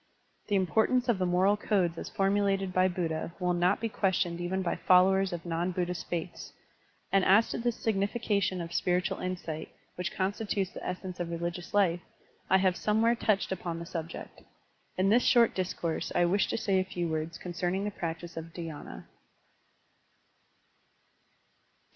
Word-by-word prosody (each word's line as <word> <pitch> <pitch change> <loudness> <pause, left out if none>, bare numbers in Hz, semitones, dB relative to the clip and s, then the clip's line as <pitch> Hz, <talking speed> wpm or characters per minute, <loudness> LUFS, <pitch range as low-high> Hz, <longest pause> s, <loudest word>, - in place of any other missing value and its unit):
The 205 - +1
importance 220 +7 +2
of 230 -6 +2
the 185 - +1
moral 185 +3 +3
codes 190 -5 +1
as - - -6
formulated 195 -1 +1
by 185 0 +4
Buddha 170 -2 -3
will 180 -1 +1
not 175 +2 +2
be 230 - -1
questioned 180 -5 0
even 190 +2 -1
by 170 - 0
followers 190 +1 +4
of 175 -1 -5
non 170 +1 -1
Buddhist 180 -1 -3
faiths, 170 0 -5 0.6
and 195 -1 +4
as 200 +5 +5
to - - -3
the 240 +1 +1
signification 200 -3 0
of 170 0 -6
spiritual 180 0 0
insight, 175 -4 -4 0.2
which 180 -1 -3
constitutes 195 0 -1
the - - -9
essence 180 0 -5
of 175 -1 -2
religious 170 +1 -4
life, 180 -4 +3 0.5
I 190 - +6
have 185 -1 +2
somewhere 220 +2 +2
touched 215 -5 0
upon 175 -2 -3
the 170 - -6
subject. 165 -1 -7 0.6
In 190 +1 +3
this 235 +4 +5
short 235 -2 +5
discourse 175 -3 -2
I 175 - +4
wish 195 +4 +2
to - - -2
say 195 -4 +1
a - - +2
few 180 -2 -3
words 160 +1 -3
concerning 180 +2 -2
the 210 - -2
practice 170 -2 -5
of 165 0 -7
dhydna. 160 - -7
185 Hz, 160 wpm, -30 LUFS, 175-195 Hz, 0.6 s, I